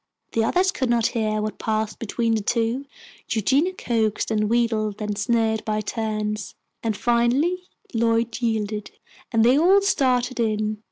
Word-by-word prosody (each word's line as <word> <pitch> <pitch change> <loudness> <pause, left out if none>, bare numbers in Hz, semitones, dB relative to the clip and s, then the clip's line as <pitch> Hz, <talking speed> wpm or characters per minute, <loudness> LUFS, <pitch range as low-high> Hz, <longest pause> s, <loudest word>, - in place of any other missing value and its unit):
The 225 - +1
others 365 +10 +2
could 260 -8 -2
not 235 -2 +2
hear 215 -2 0
what 215 - -4
passed 215 -1 -2
between 230 +1 -1
the 220 - +1
two. 230 +5 0 0.4
Eugenia 275 - +2
coaxed 225 - -1
and 210 -1 +1
wheedled 220 -3 0
and 210 -1 -2
sneered 220 0 +1
by 215 0 -1
turns, 215 -1 -3 0.3
and 220 -3 -1
finally 265 +10 +1 0.2
Lloyd 230 0 +1
yielded, 215 -2 -1 0.4
and 225 -2 +3
they 255 +4 +5
all 375 +5 +6
started 255 -8 +1
in. 215 -1 0
225 Hz, 150 wpm, -23 LUFS, 215-245 Hz, 0.4 s, all